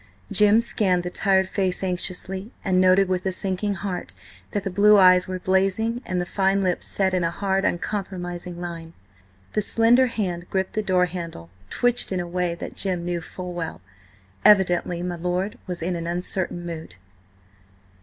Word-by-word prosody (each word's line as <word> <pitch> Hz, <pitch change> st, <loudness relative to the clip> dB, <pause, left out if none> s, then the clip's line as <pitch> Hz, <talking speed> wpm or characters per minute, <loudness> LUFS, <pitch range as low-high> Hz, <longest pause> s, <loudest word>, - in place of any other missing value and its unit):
Jim 210 Hz, +1 st, +5 dB
scanned 190 Hz, -6 st, +1 dB
the 180 Hz, -, -4 dB
tired 190 Hz, 0 st, +2 dB
face 190 Hz, -1 st, -1 dB
anxiously, 190 Hz, +3 st, -3 dB
and 185 Hz, -2 st, +3 dB
noted 185 Hz, +1 st, +5 dB
with 185 Hz, 0 st, -1 dB
a 190 Hz, -, 0 dB
sinking 195 Hz, +2 st, -1 dB
heart 190 Hz, -1 st, -4 dB, 0.3 s
that 205 Hz, -, -3 dB
the -, -, -2 dB
blue 210 Hz, +3 st, +6 dB
eyes 185 Hz, -1 st, +6 dB
were 185 Hz, 0 st, -3 dB
blazing 195 Hz, +6 st, +1 dB
and 180 Hz, -1 st, -1 dB
the 175 Hz, -, -1 dB
fine 195 Hz, +1 st, +1 dB
lips 180 Hz, -2 st, 0 dB
set 190 Hz, -1 st, 0 dB
in 180 Hz, -1 st, +1 dB
a 165 Hz, -, +1 dB
hard, 195 Hz, +2 st, -1 dB
uncompromising 175 Hz, -2 st, -3 dB
line. 170 Hz, -2 st, -7 dB, 0.6 s
The 210 Hz, -, +1 dB
slender 230 Hz, +5 st, +4 dB
hand 180 Hz, -7 st, -3 dB
gripping 190 Hz, -1 st, -1 dB
the 215 Hz, -, 0 dB
door 180 Hz, -1 st, +4 dB
handle 165 Hz, -, -7 dB, 0.2 s
twitched 245 Hz, -3 st, +1 dB
in 185 Hz, -, -1 dB
a 175 Hz, -, -2 dB
way 175 Hz, -1 st, -1 dB
that -, -, -8 dB
Jim 180 Hz, -3 st, -2 dB
knew 175 Hz, -1 st, -2 dB
full 180 Hz, +2 st, -7 dB
well; 170 Hz, -2 st, -5 dB, 0.6 s
evidently 180 Hz, -3 st, +4 dB
my 175 Hz, -1 st, -3 dB
lord 180 Hz, +4 st, -2 dB
was 175 Hz, -2 st, -4 dB
in 180 Hz, +1 st, -1 dB
an 170 Hz, 0 st, -4 dB
uncertain 175 Hz, 0 st, -3 dB
mood. 160 Hz, -, -7 dB
185 Hz, 175 wpm, -24 LUFS, 175-195 Hz, 0.6 s, blue